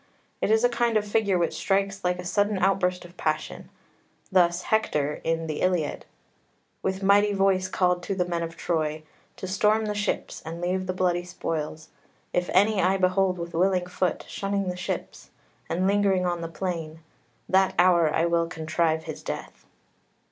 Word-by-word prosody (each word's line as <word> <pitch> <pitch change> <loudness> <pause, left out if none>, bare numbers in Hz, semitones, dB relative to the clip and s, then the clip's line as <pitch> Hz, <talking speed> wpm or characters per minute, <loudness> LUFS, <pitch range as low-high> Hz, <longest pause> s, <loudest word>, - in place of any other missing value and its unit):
It - - +1
is 220 +1 +4
a - - +7
kind 235 -2 +1
of 210 -1 -1
figure 205 -3 +2
which 170 -1 0
strikes 195 0 0
like 180 0 +1
a 180 - -7
sudden 205 +2 +1
outburst 185 -1 +1
of 175 0 -15
passion. 155 0 -3 0.6
Thus 175 -1 +3
Hector 150 -9 0
in 165 0 0
the 155 -2 -4
Iliad 180 -5 0 0.7
"With 190 +1 -2
mighty 205 +1 +4
voice 195 -1 +2
called 180 -1 +1
to 195 - -3
the 180 -1 +1
men 170 -1 -2
of 165 0 -5
Troy 155 -3 -1 0.3
To 185 - -5
storm 210 +3 +2
the 210 - -1
ships, 205 0 -2
and 165 +1 -6
leave 185 +1 -1
the 185 - -1
bloody 180 -1 +1
spoils: 160 -3 -4 0.4
If 180 0 0
any 200 +2 +4
I 190 +2 +3
behold 185 0 +2
with 170 0 -6
willing 180 +1 +2
foot 180 -1 -2
Shunning 200 -1 -2
the 180 - -3
ships, 180 - -5 0.4
and 185 +2 0
lingering 195 -2 +2
on 175 -1 -1
the 165 - -3
plain, 165 -2 -4 0.5
That 190 0 +3
hour 170 -3 +5
I 160 +2 +2
will 170 0 +1
contrive 160 -1 -1
his - - -7
death." - - -7
180 Hz, 175 wpm, -26 LUFS, 170-195 Hz, 0.7 s, a